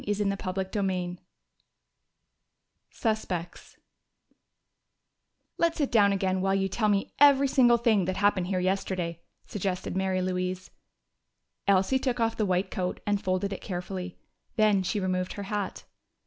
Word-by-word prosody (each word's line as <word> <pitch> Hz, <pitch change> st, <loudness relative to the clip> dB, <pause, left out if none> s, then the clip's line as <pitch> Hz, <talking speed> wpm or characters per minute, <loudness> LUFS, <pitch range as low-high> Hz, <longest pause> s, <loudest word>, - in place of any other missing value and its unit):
CHAPTER 200 Hz, -1 st, -2 dB
III 180 Hz, -2 st, -2 dB, 1.7 s
Suspects 190 Hz, -7 st, -3 dB, 1.8 s
"Let's 335 Hz, -1 st, +2 dB
sit 290 Hz, -4 st, 0 dB
down 205 Hz, -4 st, +5 dB
again 190 Hz, -1 st, 0 dB
while 195 Hz, 0 st, +1 dB
you 195 Hz, 0 st, +1 dB
tell 215 Hz, +3 st, 0 dB
me 200 Hz, -1 st, 0 dB
every 280 Hz, -1 st, +6 dB
single 245 Hz, -3 st, +5 dB
thing 225 Hz, -5 st, +2 dB
that 185 Hz, +1 st, -2 dB
happened 200 Hz, -3 st, +2 dB
here 185 Hz, -1 st, 0 dB
yesterday," 180 Hz, -2 st, -1 dB, 0.3 s
suggested 190 Hz, -3 st, -3 dB
Mary 190 Hz, -1 st, 0 dB
Louise. 185 Hz, 0 st, -3 dB, 1.0 s
Elsie 200 Hz, +7 st, +3 dB
took 255 Hz, -2 st, -1 dB
off 225 Hz, 0 st, +1 dB
the 215 Hz, -, 0 dB
white 185 Hz, +1 st, 0 dB
coat 180 Hz, -1 st, -2 dB
and 205 Hz, -1 st, 0 dB
folded 185 Hz, +1 st, -1 dB
it -, -, -7 dB
carefully. 180 Hz, 0 st, -5 dB, 0.4 s
Then 215 Hz, -3 st, +4 dB
she 195 Hz, +3 st, -1 dB
removed 185 Hz, -1 st, -1 dB
her 205 Hz, -, -6 dB
hat. 200 Hz, 0 st, -4 dB
195 Hz, 135 wpm, -28 LUFS, 185-210 Hz, 1.8 s, every